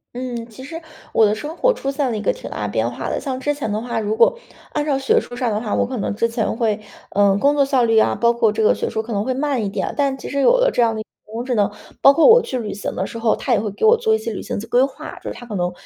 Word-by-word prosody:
嗯， 245 -2 -4
其 225 +4 -12
实 325 +5 -7 0.3
我 220 - +5
的 210 - +2
生 300 +9 -6
活 - - +3
出 275 - -4
现 275 -3 -1
了 220 - -2
一 - - -4
个 - - +1
挺 - - -9
大 105 -1 -3
变 110 +3 0
化 120 - -5
的。 - - -1
像 260 -2 -3
之 290 +2 0
前 270 -8 -4
的 210 - -1
话， 235 -1 -4
如 215 +1 -2
果 - - +4 0.4
按 295 0 -1
照 275 -3 +1
学 270 - +3
术 245 - -9
上 245 -2 0
的 210 - -1
话， 215 - -3
我 - - +2
可 255 -1 -4
能 - - -2
之 230 +2 +1
前 230 -1 -2
会 220 -3 +1 0.3
呃， 200 -1 +3
工 285 +6 +3
作 285 - +4
效 265 -3 +2
率 225 -1 +2
啊， - - +4
包 235 0 +3
括 230 -2 +2
这 220 +1 -2
个 215 - +4
学 - - -2
术 220 - -2
可 225 +1 -6
能 200 0 0
会 255 +2 -1
慢 275 -3 -1
一 200 - -1
点。 195 -1 -3
但 275 -2 +1
其 - - -8
实 280 0 -1
有 - - +5
了 - - +3
这 245 - 0
样 225 -1 +2
的 - - -4
一 - - -4
个 - - -61 0.2
人 215 - -15
工 235 +2 -4
智 250 -2 -1
能， 205 -1 +2 0.3
包 275 - +8
括 330 - +5
我 485 +1 +8
去 260 - -4
旅 215 -3 -4
行 205 - -4
的 190 - -2
时 230 - -8
候， 225 -1 +1
它 255 - 0
也 225 - +3
会 210 -2 -3
给 325 - -1
我 455 +2 +7
做 450 -1 +1
一 440 - +3
些 230 - -5
旅 - - -5
行 - - -4
季 225 - -8
规 250 +2 +3
划， 275 - -5
就 - - -6
是 - - -9
它 245 - -10
可 215 -3 -6
能 180 -1 -1
235 Hz, 365 characters per minute, -20 LUFS, 215-275 Hz, 0.4 s, 包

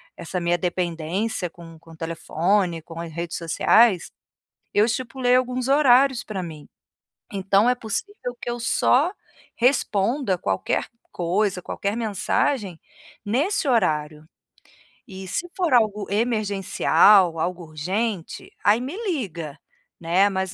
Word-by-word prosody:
essa 175 +2 -4
minha 175 0 +1
dependência 180 +3 -2
com 165 -1 -13
com 165 - -20
o 160 - -14
telefone, 170 +2 0
com 165 0 -10
as 170 -1 -6
redes 170 +1 -5
sociais, 180 +4 +3 0.6
eu 205 - +5
estipulei 245 +1 0
alguns 255 0 -1
horários 270 -2 +4
pra 195 -4 -5
mim, 155 -4 -9 0.6
então, 195 +3 +2
é 250 - +2
possível 245 - -5
que - - -4
eu 240 - -4
só 255 +5 +3 0.5
responda, 235 -3 +1
qualquer 95 - -1 0.3
coisa, 185 +2 0
qualquer 200 +3 -3
mensagem 215 - -1 0.5
nesse 300 - 0
horário. 155 -9 0 0.8
E 190 -3 -9
se 345 - -3
for 350 -7 +1
algo 210 -4 +2
emergencial, 205 -4 +3
algo 175 +2 -2
urgente, 180 +5 -3
aí 210 +3 +4
me 270 +7 -5 0.2
liga, 170 - -5 0.4
né, 180 +4 +3
mas 190 -1 -3
200 Hz, 125 wpm, -23 LUFS, 170-240 Hz, 0.8 s, eu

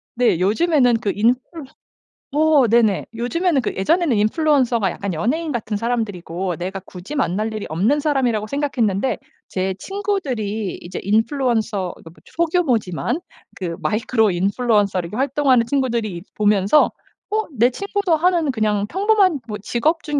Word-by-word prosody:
네. 235 -8 +2
요즘에는 250 - +3
그 205 -4 -1 1.0
인플루어 305 -1 +2
어 235 - +3
네네. 220 -3 +3
요즘에는 275 +6 0
그 - - -3
예전에는 290 - +2
인플루언서가 240 - +2
약간 200 -2 -4
연예인 295 - -1
같은 220 -4 -2
사람들이고 195 -6 -2
내가 190 +2 -4
굳이 180 +8 -9
만날 215 -3 -1
일이 215 - -5
없는 205 - +1
사람이라고 250 -8 0
생각했는데 260 -5 0 0.3
제 190 0 -2
친구들이 255 - -3
이제 175 +1 -6
인플루언서 220 - 0
그 165 - -14
뭐 - - -17
소규모지만 285 - 0 0.4
그 175 -3 -4
마이크로 220 -1 +1
인플루언서로 200 -1 +1
활동하는 265 -1 +2
친구들이 235 -9 -1
보면서 210 +5 +3 0.4
'어. 435 +1 0
내 235 +3 +5
친구도 400 +1 0
하는 335 -2 +2
그냥 210 -3 0
평범한 390 -4 +2
뭐 210 - -3
직업 305 +10 0
중에 295 -2 -1
235 Hz, 350 characters per minute, -20 LUFS, 205-295 Hz, 1.0 s, 내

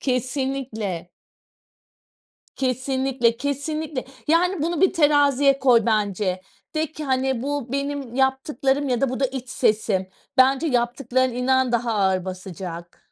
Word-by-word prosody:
Kesinlikle. 255 - -2 1.5
Kesinlikle, 260 -2 0
kesinlikle. 285 +1 -3 0.2
Yani, 345 0 +2
bunu 335 -1 -1
bir 380 - +4
teraziye 285 -3 +4
koy 240 -4 +4
bence. 200 -4 0 0.3
De 315 0 -1
ki, 310 - -6
hani, 260 -2 0
"Bu 280 -3 -3
benim 280 -3 -3
yaptıklarım 265 +1 +1
ya 245 -2 0
da 275 - +2
bu 255 - -4
da 270 - +3
iç 255 -1 -7
sesim." 210 -6 +1 0.3
Bence 270 +4 +4
yaptıkların, 250 0 +1
inan, 255 0 +1
daha 235 -1 +1
ağır 190 -2 +1
basacak. 180 -2 -7
260 Hz, 125 wpm, -23 LUFS, 230-280 Hz, 1.5 s, bir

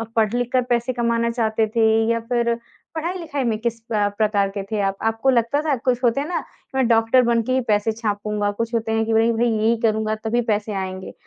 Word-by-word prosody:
पढ़-लिख 235 +3 +1
कर 255 - +4
पैसे 240 +1 +1
कमाना 235 -1 0
चाहते 220 -2 0
थे? 220 0 +2 0.2
या 230 - +1
फ़िर 235 0 0 0.4
पढ़ाई-लिखाई 320 -4 -3
में 225 -3 0
किस 230 0 -2
अ, 205 -1 +2
प्रकार 205 -2 +2
के 195 - -2
थे 215 - -1
आप? 195 0 -1
आपको 225 +4 +1
लगता 245 +4 +2
था 295 - +2
कुछ 250 0 -1
होते 245 +4 +2
हैं 295 - -4
ना 355 - -2 0.3
मैं 265 -3 +2
डॉक्टर 225 +2 +4
बन 235 -1 +2
के 255 - -3
ही 260 - +2
पैसे 210 +1 +2
छापूँगा 210 -1 -2
कुछ 230 +1 -2
होते 225 -1 -1
हैं 225 0 +1
कि 225 - -1
नहीं 225 +1 +3
भाई 235 +1 +1
यही 225 +1 +2
करूँगा 220 -1 +1
तभी 235 +2 +1
पैसे 210 0 -1
आएँगे। 190 -1 -5
230 Hz, 220 wpm, -22 LUFS, 215-240 Hz, 0.4 s, कर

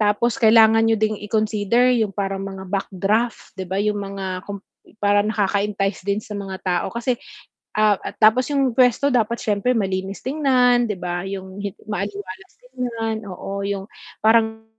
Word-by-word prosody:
tapos 215 +4 +1
kailangan 225 0 +6
niyo 225 - +4
ding 215 -1 0
i-consider 215 +3 +1
yung 205 -3 -1
parang 195 -1 -2
mga 195 -1 -7
backdraft, 200 +4 -1
'di 190 - -3
ba 190 - -2
yung 210 0 0
mga 195 -2 -5
kum 200 -1 -6 0.4
parang 205 +1 +3
nakaka-entice 205 -1 0
din 200 0 +1
sa 210 - -10
mga 195 -1 -5
tao 180 -2 0
kasi 235 +2 -1 0.6
ah, 215 -1 +4
at - - -7
tapos 220 +4 +4
yung 275 -3 +1
puwesto 250 +3 +3
dapat 235 -1 +1
siyempre 210 +4 +1
malinis 195 -1 -2
tingnan 255 -4 +3
'di 210 - -2
ba, 175 -1 -3
yung 190 0 -7
hit 200 -1 -5
maaliwalas 200 -2 -6
tignan, 230 -3 -4
oo 195 +1 -5
yung 200 -1 -3 0.4
parang 220 0 +3
210 Hz, 160 wpm, -21 LUFS, 195-230 Hz, 0.6 s, kailangan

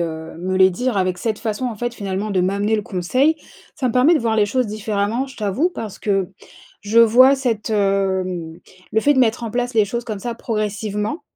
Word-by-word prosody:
heu, 160 -1 -5
me 185 +2 -2
les 190 0 +6
dire 245 +5 -2
avec 185 -2 0
cette 220 +2 -2
façon, 225 +2 -3
en 235 -3 -4
fait, 240 +2 -3
finalement 200 -1 -3
de 185 - +2
m'amener 200 +4 0
le 215 - 0
conseil, 255 - +1 0.4
ça 265 - -1
me - - -2
permet 255 +8 +5
de - - +3
voir 230 -3 0
les 210 -1 +3
choses 250 +4 0
différemment, 215 +3 -2
je 265 - -13
t'avoue, 215 - 0
parce 215 - -7
que 195 -3 0 0.5
je 210 +3 +1
vois 250 +4 +7
cette, 235 -5 -2
hem, 190 -5 -1 0.3
le 220 - +2
fait 290 +5 +3
de 260 - +3
mettre 235 -1 +1
en 225 - -4
place 245 0 -2
les 215 -2 +4
choses 235 +4 -4
comme 215 -4 -5
ça 235 +4 -4
progressivement, 215 +2 -3
215 Hz, 215 wpm, -20 LUFS, 195-240 Hz, 0.5 s, vois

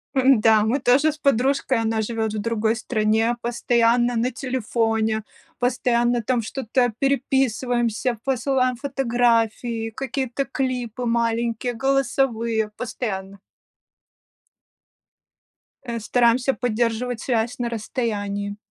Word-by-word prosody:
Да, 225 -5 +5
мы 235 +6 +1
тоже 275 +5 +3
с 310 - -11
подружкой- 270 -2 +1
она 225 0 0
живет 220 -1 -2
в 215 - -2
другой 225 0 0
стране- 225 0 +1
постоянно 240 0 +2
на 235 +3 0
телефоне, 225 -4 -1 0.4
постоянно, 240 -1 +1
там, 245 +1 +1
что-то 245 +1 0
переписываемся, 250 -3 0
посылаем 260 -1 +1
фотографии, 235 -3 0
какие-то 265 +2 -3
клипы 250 -3 -3
маленькие, 235 +1 0
голосовые, 235 -4 0
постоянно. 200 -5 -5 2.4
Э, 235 -2 -4
стараемся 245 +3 +2
поддерживать 240 0 -1
связь 235 -1 -1
на 240 -1 -1
расстоянии. 205 -3 -3
235 Hz, 95 wpm, -23 LUFS, 225-255 Hz, 2.4 s, Да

